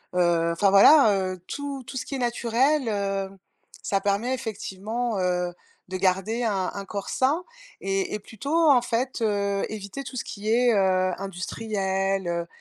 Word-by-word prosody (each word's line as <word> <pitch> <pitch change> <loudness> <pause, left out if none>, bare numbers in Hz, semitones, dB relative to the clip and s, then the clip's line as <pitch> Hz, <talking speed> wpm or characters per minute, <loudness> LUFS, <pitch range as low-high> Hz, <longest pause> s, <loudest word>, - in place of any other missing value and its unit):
heu, 170 -2 +2
enfin 200 +4 +3
voilà, 210 +4 +7 0.2
heu. 185 - -10
Tout, 280 -2 -5
tout 260 - -7
ce - - -3
qui 275 - -5
est - - -2
naturel, 245 +3 +1
heu, 195 -2 -1 0.5
ça 195 - +1
permet 205 +6 0
effectivement, 220 -1 -3
heu, 180 -1 0 0.4
de 185 - -5
garder 195 +5 0
un 195 -5 0
un 200 - -5
corps 200 0 -5
sain 290 +7 +1 0.4
et 195 0 -1
et 210 - -2
plutôt 230 +9 -5 0.2
en 250 - +5
fait, 245 +1 -2
heu, 200 -2 0
éviter 215 +5 -6
tout 260 - -9
ce - - -2
qui 210 +1 -6
est, 240 0 +4
heu, 185 -2 +2
industriel, 195 0 -2
heu, 170 0 -2
205 Hz, 165 wpm, -25 LUFS, 190-240 Hz, 0.5 s, voilà